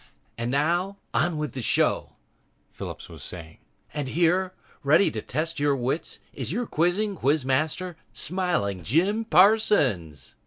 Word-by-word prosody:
"... -, -, -40 dB
And 115 Hz, +1 st, -1 dB
now, 170 Hz, +8 st, +1 dB, 0.2 s
on 160 Hz, +2 st, +1 dB
with 150 Hz, -1 st, -2 dB
the 130 Hz, -, -4 dB
show," -, -, +1 dB, 0.6 s
Phillips -, -, -7 dB
was -, -, -12 dB
saying. 80 Hz, -3 st, -9 dB, 0.3 s
"And 145 Hz, -2 st, -3 dB
here, 175 Hz, +5 st, +1 dB, 0.3 s
ready 155 Hz, +8 st, +4 dB
to 110 Hz, -, -4 dB
test 155 Hz, +6 st, -2 dB
your 145 Hz, -1 st, +2 dB
wits, 130 Hz, +5 st, -3 dB
is 130 Hz, -1 st, -3 dB
your 240 Hz, +6 st, -1 dB
quizzing 195 Hz, +4 st, 0 dB
quiz 145 Hz, -1 st, +1 dB
master, 155 Hz, +6 st, 0 dB, 0.2 s
Smiling 170 Hz, -, -1 dB
Jim 185 Hz, -, +2 dB
Parsons." 170 Hz, -, +3 dB
155 Hz, 145 wpm, -26 LUFS, 130-185 Hz, 0.6 s, ready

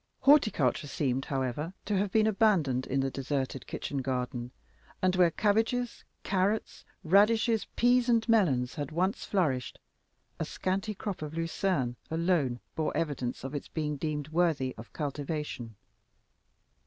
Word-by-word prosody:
Horticulture 215 Hz, -, +4 dB
seemed, 135 Hz, -2 st, -1 dB
however, 135 Hz, +6 st, -2 dB
to 210 Hz, -, 0 dB
have 195 Hz, 0 st, 0 dB
been 215 Hz, +1 st, +4 dB
abandoned 190 Hz, -, +2 dB
in 135 Hz, +1 st, +1 dB
the 135 Hz, 0 st, -1 dB
deserted 135 Hz, -1 st, -3 dB
kitchen 140 Hz, -, -3 dB
garden; 125 Hz, -1 st, -3 dB, 0.5 s
and 185 Hz, 0 st, +2 dB
where 180 Hz, -2 st, +5 dB
cabbages, 225 Hz, +7 st, 0 dB, 0.2 s
carrots, 200 Hz, +3 st, 0 dB, 0.2 s
radishes, 220 Hz, +5 st, +4 dB
peas, 245 Hz, 0 st, +4 dB
and 230 Hz, -1 st, +3 dB
melons 150 Hz, -, +3 dB
had 145 Hz, -3 st, -4 dB
once 185 Hz, +5 st, 0 dB
flourished, 145 Hz, -11 st, 0 dB, 0.6 s
a -, -, 0 dB
scanty 195 Hz, +3 st, -2 dB
crop 200 Hz, -3 st, -5 dB
of 155 Hz, 0 st, -5 dB
lucern 165 Hz, -6 st, -1 dB
alone 160 Hz, -7 st, +1 dB, 0.2 s
bore 160 Hz, -1 st, -1 dB
evidence 140 Hz, -8 st, -2 dB
of 135 Hz, +2 st, -5 dB
its 145 Hz, -, -4 dB
being 150 Hz, -2 st, -2 dB
deemed 150 Hz, 0 st, -3 dB
worthy 160 Hz, -6 st, +1 dB
of 110 Hz, +2 st, -11 dB
cultivation. 145 Hz, -5 st, -4 dB
160 Hz, 135 wpm, -30 LUFS, 135-200 Hz, 0.6 s, where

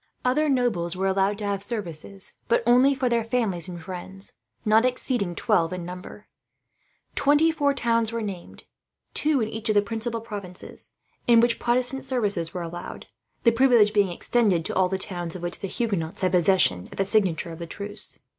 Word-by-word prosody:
Other 295 Hz, +5 st, +2 dB
nobles 225 Hz, -10 st, 0 dB
were 190 Hz, +1 st, -2 dB
allowed 195 Hz, +1 st, +1 dB
to 210 Hz, -, -5 dB
have 200 Hz, -1 st, -1 dB
services, 195 Hz, -3 st, -3 dB
but 235 Hz, -, +2 dB
only 250 Hz, +4 st, +5 dB
for 260 Hz, -1 st, 0 dB
their 235 Hz, -1 st, +1 dB
families 220 Hz, -7 st, 0 dB
and 175 Hz, -1 st, -7 dB
friends, 190 Hz, +2 st, -7 dB, 0.3 s
not 220 Hz, +1 st, +5 dB
exceeding 245 Hz, -7 st, -1 dB
twelve 165 Hz, 0 st, +1 dB
in 180 Hz, -2 st, -5 dB
number. 180 Hz, +3 st, -9 dB, 0.9 s
Twenty 295 Hz, +3 st, +4 dB
four 285 Hz, -3 st, +1 dB
towns 230 Hz, -3 st, +1 dB
were 230 Hz, -1 st, -3 dB
named, 190 Hz, -4 st, -7 dB, 0.5 s
two 300 Hz, -4 st, +3 dB
in 220 Hz, -, 0 dB
each 220 Hz, 0 st, -5 dB
of 215 Hz, -, +2 dB
the 205 Hz, -, +6 dB
principal 225 Hz, +2 st, -3 dB
provinces, 205 Hz, -5 st, -7 dB, 0.3 s
in 235 Hz, -1 st, +7 dB
which 235 Hz, 0 st, +3 dB
Protestant 250 Hz, +2 st, +2 dB
services 205 Hz, -10 st, -1 dB
were 180 Hz, 0 st, -4 dB
allowed; 175 Hz, +1 st, -7 dB, 0.4 s
the 235 Hz, -, +6 dB
privilege 230 Hz, -4 st, +4 dB
being 200 Hz, -3 st, +3 dB
extended 190 Hz, -3 st, +1 dB
to -, -, -1 dB
all 185 Hz, -1 st, +3 dB
the 190 Hz, -, -1 dB
towns 175 Hz, -3 st, -2 dB
of 180 Hz, -, -7 dB
which 175 Hz, -, -4 dB
the 195 Hz, -, -4 dB
Huguenots 195 Hz, -5 st, -2 dB
had 185 Hz, -2 st, +2 dB
possession, 175 Hz, -, +3 dB
at -, -, -11 dB
the 195 Hz, -, +1 dB
signature 190 Hz, -5 st, +2 dB
of 165 Hz, -, -9 dB
the 170 Hz, -, -6 dB
truce. 205 Hz, +4 st, -5 dB
205 Hz, 185 wpm, -25 LUFS, 180-240 Hz, 0.9 s, in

